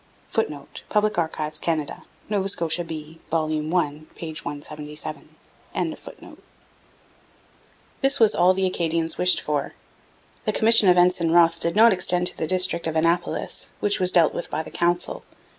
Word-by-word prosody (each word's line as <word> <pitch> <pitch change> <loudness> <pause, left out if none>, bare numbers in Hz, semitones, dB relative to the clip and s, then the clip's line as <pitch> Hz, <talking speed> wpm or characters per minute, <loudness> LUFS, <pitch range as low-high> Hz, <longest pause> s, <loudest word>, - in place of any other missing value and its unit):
[Footnote: 150 -10 -3
Public 210 -3 +1
Archives, 155 -2 -2
Canada. 155 -4 -3 0.2
Nova 200 -2 -1
Scotia 170 -2 -1
B, 160 -1 -8
vol. 155 -1 0
i, 155 -1 -1
p. 165 -2 -6
177.] 150 +1 -7 2.7
This 275 0 +2
was 220 -2 +5
all 180 +2 +4
the 190 0 +1
Acadians 165 -2 -1
wished 180 0 +4
for. 145 -2 -3 0.7
The - - 0
commission 220 -3 +5
of 180 - +5
Ensign 175 -1 +3
Wroth 170 0 +4
did 170 +2 -1
not 225 +1 +7
extend 180 -1 +1
to - - -2
the 160 - -2
district 185 -1 0
of 160 - -3
Annapolis, 165 +2 -1
which 205 0 0
was 185 -1 +4
dealt 165 -3 +4
with - - -5
by 155 - -2
the - - -11
Council. 175 0 -1
170 Hz, 145 wpm, -23 LUFS, 155-185 Hz, 2.7 s, not